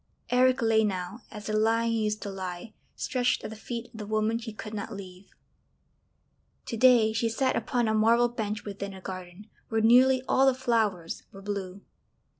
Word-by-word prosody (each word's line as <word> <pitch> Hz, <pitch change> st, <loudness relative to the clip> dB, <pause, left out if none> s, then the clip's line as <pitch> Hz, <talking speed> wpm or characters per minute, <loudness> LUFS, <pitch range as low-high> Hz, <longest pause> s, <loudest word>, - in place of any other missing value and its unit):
Eric 255 Hz, 0 st, +4 dB
lay 220 Hz, -1 st, +4 dB
now, 190 Hz, +1 st, -3 dB
as 210 Hz, -2 st, -9 dB
the 215 Hz, -, -3 dB
lion 225 Hz, +2 st, +2 dB
used 215 Hz, -1 st, -1 dB
to 200 Hz, -, -5 dB
lie, 190 Hz, +2 st, -6 dB, 0.2 s
stretched 250 Hz, -2 st, 0 dB
at -, -, -5 dB
the -, -, -7 dB
feet 235 Hz, +2 st, -6 dB
of 225 Hz, -, -10 dB
the 210 Hz, -, -6 dB
woman 215 Hz, +1 st, 0 dB
he 230 Hz, -1 st, -7 dB
could 215 Hz, 0 st, -8 dB
not 215 Hz, +1 st, -5 dB
leave. 190 Hz, -2 st, -10 dB, 1.4 s
To -, -, -4 dB
day 230 Hz, -2 st, +5 dB
she 225 Hz, +1 st, 0 dB
sat 260 Hz, +3 st, 0 dB
upon 240 Hz, -2 st, 0 dB
a 220 Hz, -, +1 dB
marble 230 Hz, +2 st, +4 dB
bench 215 Hz, -3 st, -4 dB
within 200 Hz, -1 st, -6 dB
a -, -, -9 dB
garden 185 Hz, +2 st, -8 dB, 0.2 s
where 225 Hz, -, +1 dB
nearly 255 Hz, +3 st, +5 dB
all 270 Hz, +1 st, +4 dB
the 265 Hz, -, +4 dB
flowers 220 Hz, -9 st, 0 dB
were 195 Hz, 0 st, -12 dB
blue. 200 Hz, -1 st, -5 dB
220 Hz, 185 wpm, -28 LUFS, 200-235 Hz, 1.4 s, day